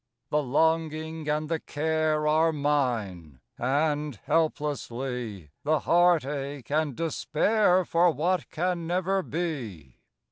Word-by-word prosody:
_ - - -1
_The 150 - +3
longing 160 0 0
and 150 +1 0
the 165 0 -1
care 155 0 0
Are 160 +2 +3
mine; 120 - -1 0.2
and, 145 +2 0
helplessly, 125 - -2
The 155 0 +1
heartache 145 -6 +1
and 150 -3 0
despair 180 - +2
For 170 +2 +3
what 170 +3 0
can 175 0 -2
never 185 +2 +1
be. 125 - -5
155 Hz, 110 wpm, -27 LUFS, 135-165 Hz, 0.2 s, The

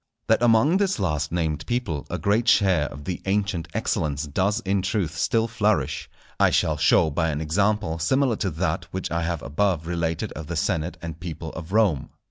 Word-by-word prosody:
That 110 +1 +3
among 120 +9 +4
this 195 -1 +1
last 75 -6 -1
named 80 -3 -1
people 120 - -2
a - - -2
great 110 +4 +1
share 95 -10 +4
of 70 +1 -9
the 90 0 -4
ancient 100 -4 0
excellence 75 -1 -1
does 95 +9 0
in 100 -2 0
truth 95 -5 -1
still 115 +5 +1
flourish, 110 -3 0 0.3
I - - +5
shall - - +1
show 80 - +4
by 80 +2 0
an 75 -1 -2
example 95 +2 0
similar 130 - +2
to - - -1
that - - -2
which - - -5
I 85 0 0
have 85 -3 -2
above 85 +1 0
related 85 -1 -2
of 80 0 -7
the 85 - -4
senate 85 0 -1
and 80 -1 -6
people 80 -2 -6
of 85 +2 -8
Rome. 100 - +2
90 Hz, 190 wpm, -24 LUFS, 80-105 Hz, 0.3 s, I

